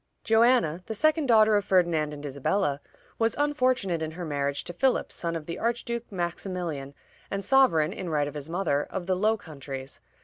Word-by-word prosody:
" - - -49
Joanna, 225 -7 +3
the 220 - -4
second 310 +4 +2
daughter 220 -2 +5
of 205 - 0
Ferdinand 170 -6 +2
and 150 0 -8
Isabella, 145 +2 -1 0.4
was 225 0 +2
unfortunate 255 - +1
in 160 - -2
her 175 - -4
marriage 140 -2 -2
to 175 - -7
Philip, 260 +8 +1
son 170 -1 -3
of 160 -2 -5
the 170 +2 -5
Archduke 235 0 -2
Maximilian, 175 -6 -4 0.3
and 200 -1 -3
sovereign 205 -12 +4
in 180 - -5
right 150 -2 +1
of 145 - -6
his 150 0 -6
mother 170 -5 0
of 185 -2 -4
the 185 0 +1
Low 215 +4 +2
Countries. 135 -6 -8
180 Hz, 190 wpm, -27 LUFS, 150-225 Hz, 0.4 s, daughter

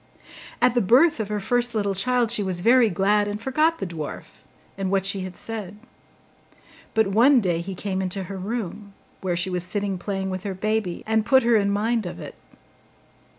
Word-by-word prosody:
At 250 -1 +5
the 245 - +2
birth 250 - +4
of 215 - -2
her 210 0 -2
first 245 +3 0
little 200 -2 0
child 240 +3 +1
she 235 - +3
was 185 -3 +1
very 235 +2 +5
glad, 205 +2 +2
and 205 0 -4
forgot 310 +7 +1
the - - -4
dwarf, 165 -4 -8 0.3
and 195 -1 -3
what 195 0 +1
she 195 0 0
had 185 -1 -7
said. 210 -3 -7 1.2
But 220 0 +4
one 240 +8 +5
day 175 -6 0
he 190 +2 -6
came 190 0 -3
into 190 +1 -2
her 195 +2 -7
room, 200 0 -5 0.3
where 180 -2 -1
she 185 +2 -1
was 180 -1 -1
sitting 195 0 -3
playing 190 0 -3
with 185 -1 -4
her 195 -1 -5
baby, 215 -2 -2
and 220 0 +1
put 265 +3 +4
her 235 0 +3
in 200 -2 +2
mind 215 +1 0
of - - -7
it. - - -8
205 Hz, 195 wpm, -24 LUFS, 190-230 Hz, 1.2 s, At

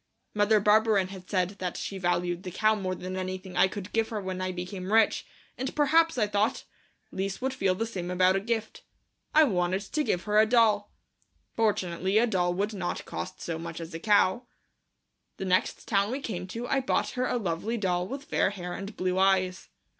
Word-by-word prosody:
Mother 210 +1 +4
Barberin 210 -2 +3
had 190 -2 -10
said 185 -3 +1
that 180 -2 -3
she 195 - -5
valued 175 -1 0
the 185 - -6
cow 215 +4 +2
more 190 -3 -2
than 185 +1 -6
anything 185 0 -5
I - - +5
could 200 0 -7
give 225 -1 +1
her 220 - -3
when 185 -1 -4
I 185 0 -1
became 185 +1 -5
rich, 225 0 +3 0.3
and 260 +1 -3
perhaps, 320 +1 +3
I 220 - +3
thought, 210 +4 0 0.5
Lise 195 +1 -3
would 265 +1 -1
feel 195 -7 +1
the 225 - -1
same 185 -6 -5
about 185 +1 +3
a - - +2
gift. 220 +1 -3 0.5
I 315 - +8
wanted 185 -6 +1
to 300 +9 -1
give 180 -10 0
her 210 0 +3
a 220 - +5
doll. 215 -3 +3 0.6
Fortunately 190 -3 +1
a 230 - +5
doll 180 -5 0
would 205 +3 -1
not 190 -3 -3
cost - - -6
so 165 -1 -4
much 165 0 -6
as 165 0 -8
a 165 - -5
cow. 210 +4 +3 0.9
The 195 - -4
next 185 0 0
town 200 -1 +2
we 260 +4 -2
came 185 -9 -5
to 230 +6 -5
I 270 - +2
bought 260 - 0
her 255 0 -1
a - - 0
lovely 205 +3 -2
doll 180 -3 0
with 275 +4 -6
fair - - +1
hair 180 -3 -6
and 200 +1 -7
blue 185 0 0
eyes. 185 -1 +2
195 Hz, 205 wpm, -28 LUFS, 185-220 Hz, 0.9 s, I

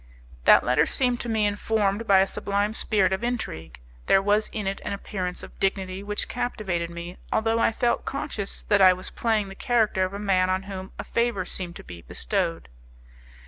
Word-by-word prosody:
That - - +7
letter 125 +5 +3
seemed 250 -2 +1
to 240 - -4
me 220 -2 +2
informed 205 +1 0
by 195 -1 +6
a - - +4
sublime 200 +2 -1
spirit 195 -4 +2
of 190 +4 -2
intrigue; 220 - -4 0.3
there 195 - +6
was 205 +2 +2
in 215 -2 -5
it 195 0 -2
an - - -3
appearance 185 -2 -4
of - - -12
dignity 190 -1 -1
which 205 +1 -3
captivated 205 -9 -2
me, 170 +1 -7
although 225 +1 +1
I - - +3
felt 235 +1 0
conscious 275 -8 -4
that 205 -2 +3
I 185 -1 +8
was 185 0 -5
playing 220 -4 0
the - - -8
character 220 -3 +1
of 185 +1 -2
a - - -3
man 190 -3 +2
on 185 +1 0
whom 190 -1 -7
a - - -4
favour 235 -6 0
seemed 175 -2 -6
to - - -9
be 85 -1 -10
bestowed. 80 +2 -2
200 Hz, 195 wpm, -25 LUFS, 185-220 Hz, 0.3 s, I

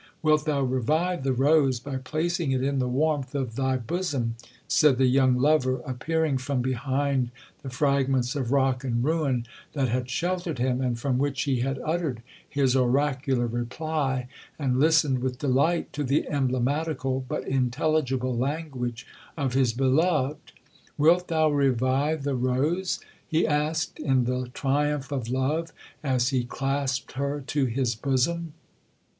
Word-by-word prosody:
'—'Wilt 155 -1 +3
thou 145 -3 +1
revive 150 +7 0
the 135 - +1
rose 135 -1 +3
by 135 +1 -5
placing 160 +3 -1
it 130 0 0
in 140 0 0
the 125 - 0
warmth 145 +1 0
of 130 -5 -2
thy 130 0 +1
bosom,' 130 -3 -2 0.3
said 150 -5 +4
the 130 - +4
young 130 0 +4
lover, 130 -1 +2
appearing 145 +2 -1
from 135 0 -2
behind 130 0 0 0.3
the 135 - -6
fragments 135 -1 +1
of 130 -4 -2
rock 135 -2 +2
and 120 -2 0
ruin 140 -5 0 0.3
that 135 -4 0
had 125 +1 -1
sheltered 175 +2 -2
him, 125 +1 0
and 125 -2 0
from 125 +1 0
which 140 -1 0
he 135 -4 0
had 135 +2 -1
uttered 155 -7 -2 0.3
his 135 -3 +2
oracular 130 0 +1
reply, 130 +2 -2 0.3
and 130 -4 0
listened 150 -3 +4
with 125 0 -2
delight 145 +5 +1
to 145 - -2
the 140 +2 +1
emblematical 135 0 0
but 150 - -3
intelligible 130 0 0
language 130 -3 -3 0.3
of 135 -4 -1
his 130 -3 +3
beloved. 140 +3 +1 0.5
'Wilt 170 +4 +4
thou 160 -2 +2
revive 140 +2 +1
the 140 0 -1
rose?' 135 +9 0 0.3
he 160 +1 +2
asked, 155 +1 -1
in 130 -3 +2
the 125 0 -2
triumph 145 0 0
of 130 -5 -3
love, 150 +6 -1 0.3
as 130 -3 +1
he 130 -2 0
clasped 135 +1 -2
her 140 +2 -2
to 145 -1 0
his 125 0 0
bosom. 145 +7 -1
135 Hz, 150 wpm, -26 LUFS, 130-150 Hz, 0.5 s, said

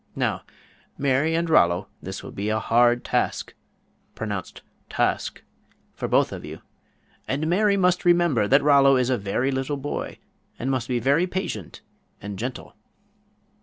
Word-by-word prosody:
Now, - - -1 0.6
Mary 140 +4 +1
and 170 +1 0
Rollo, 90 - +3
this 95 +1 -7
will - - -8
be 100 +2 -3
a 110 - +1
hard 120 +2 +3
task - - -1 0.6
(pronounced 105 -4 -5 0.3
tawsk) - - -1 0.5
for - - -4
both - - +2
of - - -7
you, - - -9 0.7
and 145 +4 -1
Mary 200 +4 +2
must 180 -1 +2
remember 175 -11 +3
that 135 +5 +4
Rollo 140 -2 +6
is 125 0 +1
a 125 - +2
very 100 +7 -1
little 135 +2 -2
boy, 140 +1 -5 0.4
and 130 +3 -2
must 130 -3 -1
be 125 - 0
very 140 +9 +2
patient 175 - -5 0.4
and 100 -1 -7
gentle." 125 +3 -6
130 Hz, 150 wpm, -24 LUFS, 110-155 Hz, 0.7 s, Rollo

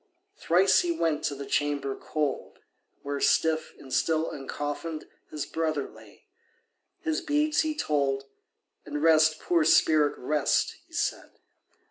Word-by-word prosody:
Thrice 185 - +3
he 350 - 0
went 165 - 0
to 140 - -1
the 140 0 -7
chamber 140 -1 -1
cold, 150 -3 -3 0.5
Where, 140 0 -3
stiff 160 -1 +1
and 130 - -10
still 160 +2 +1
uncoffinèd, 145 +3 -5 0.3
His 150 -2 -4
brother 155 -3 -2
lay, - - -17 0.8
his 320 0 -1
beads 300 -1 +1
he 310 -1 -2
told, 140 - 0 0.6
And 150 0 -4
"Rest, 155 -1 +5
poor 170 -2 +2
spirit, 155 -1 +4
rest," 150 +2 0
he - - -25
said. - - -2
155 Hz, 130 wpm, -27 LUFS, 145-165 Hz, 0.8 s, Rest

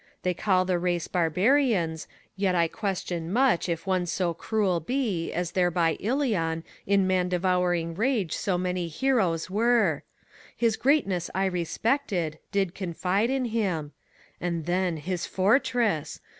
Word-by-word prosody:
They 180 - +1
call 185 0 +2
the 180 -1 0
race 175 -1 -1
Barbarians; 180 - +1 0.3
yet 190 -2 +1
I 170 -1 +3
question 180 -4 -3
much 245 -6 +2
If 165 +1 -2
one 185 -2 0
so 175 0 0
cruel 190 0 0
be, 205 - -2
as 175 -1 -2
there 180 -1 +2
by 165 -1 +1
Ilion 205 - 0 0.2
In 200 -1 +3
man 185 -1 +1
devouring 180 -2 +1
rage 215 - 0
so 190 -4 -1
many 180 -1 -2
heroes 180 - +1
were; 215 - +2 0.6
His 230 -2 +2
greatness 200 - +1
I 190 +1 +1
respected, 180 - -1
did 195 -3 0
confide 190 +4 -1
in 265 -1 0
him. 190 -10 -1 0.5
And 170 -3 -2
then, 180 -1 0
his 175 +3 -3
fortress! 215 - +1
185 Hz, 140 wpm, -27 LUFS, 170-215 Hz, 0.6 s, I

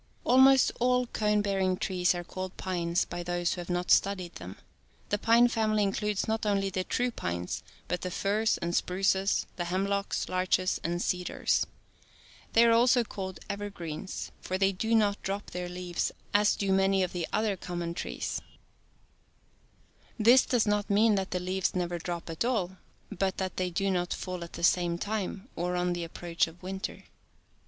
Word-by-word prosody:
Almost 265 +1 +6
all 250 +1 +3
cone 210 -3 +1
bearing 190 -2 +1
trees 180 -1 +1
are 175 - -4
called 185 +1 -6
pines 175 -2 0
by 175 0 -5
those 175 0 -1
who 180 - -5
have 175 - -9
not 175 0 -1
studied 185 -3 +2
them. - - -9 0.5
The 205 - 0
pine 235 +2 +5
family 215 -3 +1
includes 205 +1 -1
not 220 0 -1
only 200 -2 +1
the 185 0 -1
true 245 +5 0
pines, 85 - -3 0.3
but 180 - -2
the 185 - -3
firs 210 +5 +1
and 170 +1 -2
spruces, 190 +1 +1
the 175 - -2
hemlocks, 195 +3 -1
larches 185 0 +1
and 175 +1 -1
cedars. 180 -1 0 0.9
They 230 +1 +6
are 230 - +5
also 240 +1 +5
called 190 -4 -6
" - - -24
evergreens," 195 -5 -5
for 185 - -2
they 195 0 +3
do 225 +4 0
not 205 -2 +2
drop 200 +1 -4
their 180 0 -4
leaves 180 -1 -2 0.2
as 205 0 +4
do 195 -1 0
many 195 0 +3
of 180 - -3
the 175 -2 -2
other 215 -1 +1
com 175 -1 -5
85 - - -3
mon - - -4
trees. - - -4 1.8
This 240 +4 +6
does 245 -4 +2
not 210 0 0
mean 215 +2 +4
that 195 -2 0
the 180 - -1
leaves 185 +1 -1
never 175 -1 -1
drop 170 0 -5
at 165 - -2
all, 195 -7 -1 0.3
but 190 +1 -1
that 185 -1 -3
they 185 -1 0
do 195 +3 0
not 175 -1 0
fall 180 -2 -5
at 170 - -10
the - - -7
same 175 0 +3
time 205 +1 -3
or 180 +1 -1
on 180 0 +1
the 175 -1 -3
approach 170 0 -1
of 170 +3 -14
winter. 190 +1 -5
190 Hz, 180 wpm, -29 LUFS, 180-210 Hz, 1.8 s, Almost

